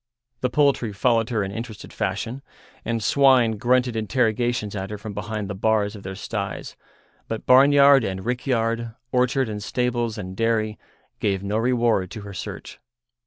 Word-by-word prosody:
The 125 Hz, -, 0 dB
poultry 140 Hz, -5 st, +2 dB
followed 115 Hz, +2 st, +2 dB
her 110 Hz, -4 st, 0 dB
in 95 Hz, -, -4 dB
interested 110 Hz, -1 st, -7 dB
fashion, 125 Hz, +2 st, -3 dB, 0.4 s
and 115 Hz, -1 st, -2 dB
swine 130 Hz, -5 st, +4 dB
grunted 125 Hz, +2 st, +2 dB
interrogations 110 Hz, -1 st, 0 dB
at 95 Hz, -1 st, -4 dB
her 105 Hz, -, -5 dB
from 105 Hz, 0 st, -7 dB
behind 105 Hz, 0 st, -4 dB
the 100 Hz, -, -4 dB
bars 105 Hz, +1 st, +1 dB
of 100 Hz, -, -9 dB
their 95 Hz, 0 st, -6 dB
styes, 105 Hz, -, -5 dB, 0.5 s
but 110 Hz, -1 st, -5 dB
barnyard 140 Hz, +1 st, +6 dB
and 95 Hz, -1 st, -4 dB
rickyard, 115 Hz, -2 st, -1 dB, 0.2 s
orchard 125 Hz, +1 st, +2 dB
and 105 Hz, -1 st, -5 dB
stables 120 Hz, 0 st, -1 dB
and 95 Hz, -2 st, -6 dB
dairy, 110 Hz, -1 st, 0 dB, 0.4 s
gave 100 Hz, -2 st, 0 dB
no 100 Hz, +2 st, -1 dB
reward 115 Hz, -6 st, +1 dB
to 110 Hz, +2 st, -8 dB
her 100 Hz, 0 st, -9 dB
search. 90 Hz, -, -7 dB
115 Hz, 160 wpm, -23 LUFS, 105-125 Hz, 0.5 s, barnyard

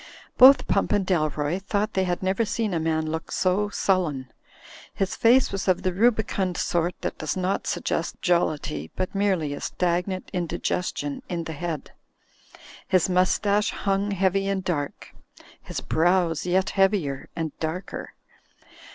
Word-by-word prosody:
Both 265 Hz, +2 st, +8 dB
Pump 200 Hz, -, +1 dB
and 205 Hz, -2 st, +2 dB
Dalroy 155 Hz, -1 st, 0 dB
thought 205 Hz, +2 st, -1 dB
they 190 Hz, -1 st, +1 dB
had 180 Hz, +1 st, -2 dB
never 190 Hz, +4 st, +1 dB
seen 220 Hz, -2 st, -1 dB
a 165 Hz, -, 0 dB
man 160 Hz, 0 st, 0 dB
look 160 Hz, 0 st, -5 dB
so 195 Hz, +3 st, +1 dB
sullen. 160 Hz, -11 st, -1 dB, 0.6 s
His 195 Hz, -1 st, -1 dB
face 245 Hz, +3 st, +4 dB
was 195 Hz, 0 st, -3 dB
of 185 Hz, -2 st, +2 dB
the 185 Hz, -, 0 dB
rubicund 205 Hz, -4 st, +1 dB
sort 175 Hz, 0 st, -1 dB
that -, -, -4 dB
does 155 Hz, +3 st, -2 dB
not 185 Hz, +1 st, -1 dB
suggest 165 Hz, -, -2 dB
jollity, 150 Hz, -, 0 dB
but 185 Hz, -, -3 dB
merely 190 Hz, -7 st, 0 dB
a 145 Hz, -, -7 dB
stag 175 Hz, 0 st, 0 dB
nant 185 Hz, -1 st, -5 dB
indigestion 175 Hz, -4 st, -2 dB
in 170 Hz, -2 st, -2 dB
the 165 Hz, -, -6 dB
head. 160 Hz, -1 st, -5 dB, 1.0 s
His 185 Hz, -1 st, +2 dB
mustache 200 Hz, +3 st, +2 dB
hung 195 Hz, 0 st, -1 dB
heavy 195 Hz, 0 st, +1 dB
and 195 Hz, -1 st, -1 dB
dark, 145 Hz, -6 st, -4 dB, 0.5 s
his -, -, -5 dB
brows 175 Hz, -1 st, +1 dB
yet 185 Hz, +2 st, +1 dB
heavier 190 Hz, -9 st, +1 dB
and 165 Hz, -2 st, -2 dB
darker. 165 Hz, +4 st, -5 dB
180 Hz, 150 wpm, -25 LUFS, 165-195 Hz, 1.0 s, Both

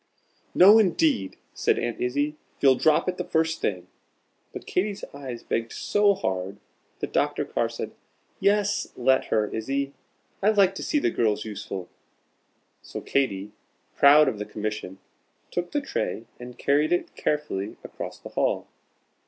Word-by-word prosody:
"No 205 Hz, +5 st, +9 dB
indeed," 160 Hz, -, +2 dB, 0.2 s
said -, -, +1 dB
Aunt 120 Hz, -, -3 dB
Izzie; 145 Hz, +5 st, 0 dB, 0.2 s
"you'll 135 Hz, -2 st, +6 dB
drop 155 Hz, +5 st, +3 dB
it 180 Hz, 0 st, -1 dB
the -, -, 0 dB
first 160 Hz, -1 st, 0 dB
thing." 90 Hz, -3 st, -1 dB, 0.7 s
But -, -, -8 dB
Katy's 200 Hz, +2 st, -1 dB
eyes 130 Hz, -4 st, -7 dB
begged 115 Hz, 0 st, -2 dB
so 205 Hz, -1 st, +2 dB
hard, 95 Hz, -, -3 dB, 0.4 s
that -, -, -4 dB
Dr. -, -, +1 dB
Carr -, -, -1 dB
said, -, -, -5 dB, 0.5 s
"Yes, 205 Hz, +1 st, +1 dB
let 130 Hz, +1 st, +3 dB
her, 110 Hz, -1 st, +1 dB
Izzie; 135 Hz, +5 st, -2 dB, 0.5 s
I 200 Hz, -, +4 dB
like 200 Hz, -3 st, +4 dB
to -, -, -6 dB
see 300 Hz, -, 0 dB
the 285 Hz, -, +2 dB
girls 105 Hz, -2 st, 0 dB
useful." 100 Hz, -4 st, -6 dB, 0.9 s
So -, -, -7 dB
Katy, 105 Hz, -7 st, -1 dB, 0.4 s
proud 145 Hz, +2 st, +7 dB
of 105 Hz, -, -1 dB
the 105 Hz, -, -3 dB
commission, 105 Hz, -3 st, -5 dB, 0.5 s
took 175 Hz, 0 st, -2 dB
the 290 Hz, -, 0 dB
tray 115 Hz, -, -3 dB
and 125 Hz, 0 st, -9 dB
carried 145 Hz, +2 st, +2 dB
it 175 Hz, -, 0 dB
carefully 130 Hz, -10 st, -2 dB
across -, -, -7 dB
the -, -, -10 dB
hall. -, -, 0 dB
140 Hz, 150 wpm, -26 LUFS, 110-180 Hz, 0.9 s, No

